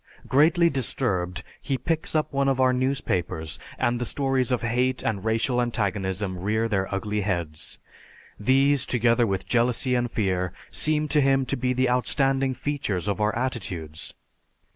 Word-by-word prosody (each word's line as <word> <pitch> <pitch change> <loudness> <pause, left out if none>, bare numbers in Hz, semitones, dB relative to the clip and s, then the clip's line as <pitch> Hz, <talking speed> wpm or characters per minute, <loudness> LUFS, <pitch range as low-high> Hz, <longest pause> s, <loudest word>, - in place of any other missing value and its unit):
Greatly 160 +5 +4
disturbed, 100 - -1 0.2
he 135 - -1
picks 160 +5 -2
up 155 -2 0
one 140 0 +2
of 135 -1 0
our 130 -1 +4
newspapers 125 - -1 0.2
and 120 0 0
the - - +1
stories 135 -1 0
of 125 -2 0
hate 125 +2 +1
and 100 -4 -1
racial 115 +3 +1
antagonism 100 -5 -1
rear 110 +4 0
their 95 -3 -1
ugly 105 +2 -1
heads. 85 -6 -3 0.6
These, 135 +5 +3
together 120 -1 +3
with 95 -2 -2
jealousy 125 +2 +1
and 120 -1 +1
fear, 90 -5 -1 0.2
seem 150 +11 +1
to 150 +1 +3
him 135 -1 +3
to - - 0
be 125 +1 0
the 130 +1 +2
outstanding 135 +1 +1
features 125 - -2
of 100 +1 -1
our 105 0 +1
attitudes. 95 - -4
120 Hz, 155 wpm, -25 LUFS, 100-135 Hz, 0.6 s, Greatly